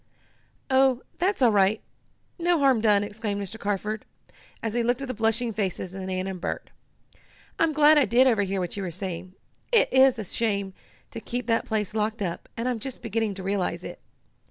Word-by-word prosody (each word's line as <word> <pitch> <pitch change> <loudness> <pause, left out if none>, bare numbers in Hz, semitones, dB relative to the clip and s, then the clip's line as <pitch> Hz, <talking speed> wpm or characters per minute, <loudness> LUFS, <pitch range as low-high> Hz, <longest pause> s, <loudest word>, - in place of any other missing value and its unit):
"Oh, 260 -1 +4 0.2
that's 370 -5 +1
all 235 - +6
right 205 +1 +3 0.6
no 345 0 +2
harm 270 -6 +3
done!" 205 -2 +4
exclaimed 205 0 -3
Mr. 205 +3 -6
Carford, 210 +1 -2 0.6
as 225 -2 -2
he 240 - +1
looked 245 +3 0
at - - -4
the 255 - -3
blushing 225 +1 0
faces 190 -3 -3
of 190 - -6
Nan 185 0 -3
and 190 -2 -5
Bert. - - -4 0.9
"I'm 325 -1 +3
glad 300 0 +6
I 280 - +4
did 240 +4 +4
overhear 205 -6 +2
what 180 -2 -3
you 200 - -4
were 185 - -3
saying. 185 +1 -6 0.4
It 460 - +3
is 260 -1 +6
a 220 - -3
shame 200 -1 -1 0.4
to - - -6
keep 245 +1 -4
that 230 -1 +1
place 215 -2 -1
locked 215 0 -1
up, 170 -3 -5
and 230 +2 -2
I'm 245 -2 -1
just 260 +2 -7
beginning 225 -2 -1
to 190 - -7
realize 195 -1 -1
it. - - -8
220 Hz, 195 wpm, -26 LUFS, 195-250 Hz, 0.9 s, all